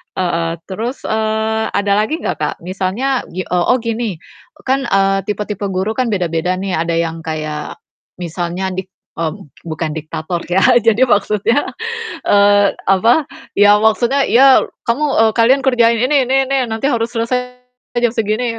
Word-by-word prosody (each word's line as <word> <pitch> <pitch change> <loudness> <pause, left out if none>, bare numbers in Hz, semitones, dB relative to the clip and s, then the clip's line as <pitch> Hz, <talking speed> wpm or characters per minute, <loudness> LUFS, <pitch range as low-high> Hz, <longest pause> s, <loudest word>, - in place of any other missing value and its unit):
Heeh, 170 -2 -1
terus 225 +7 -5
eee, 220 0 -1
ada 200 0 +1
lagi 305 +11 -1
ga - - -1
Kak? - - -3
Misalnya, 195 +9 -2
gi 185 +1 -4
oh 180 -1 +2
oh - - +1
gini, 230 -3 -2 0.4
e - - -16
kan, 270 +1 +1
eee, 195 0 +2
tipe-tipe 210 -1 -3
guru 190 +3 -1
kan 255 -1 +1
beda-beda 180 -1 -1
nih. 195 -1 -3
Ada 165 +1 -1
yang 165 0 -2
kayak 155 -1 -5 0.4
misalnya 175 +2 -3
dik 190 0 -5 0.3
mmm, 160 -2 -3 0.2
bukan 160 0 -3
diktator 160 +2 -4
ya 185 +2 +2 0.2
jadi 230 +3 +3
maksudnya 210 +5 +1 0.6
eee, 205 0 +4 0.2
apa. 230 +10 +4 0.3
Ya 205 0 +6
maksudnya 240 +5 +2
ya 265 +2 +6 0.3
kamu 265 +6 +1 0.2
eee, 225 - +5
"Kalian 260 +4 +4
kerjain 235 -2 +3
ini 275 +2 +3
ini, 270 +1 +1
nanti 225 +4 -2
harus 230 -3 -1
selesai 250 +2 -2 0.4
jam 240 -2 +2
segini 225 +1 -1
210 Hz, 150 wpm, -16 LUFS, 185-240 Hz, 0.6 s, Ya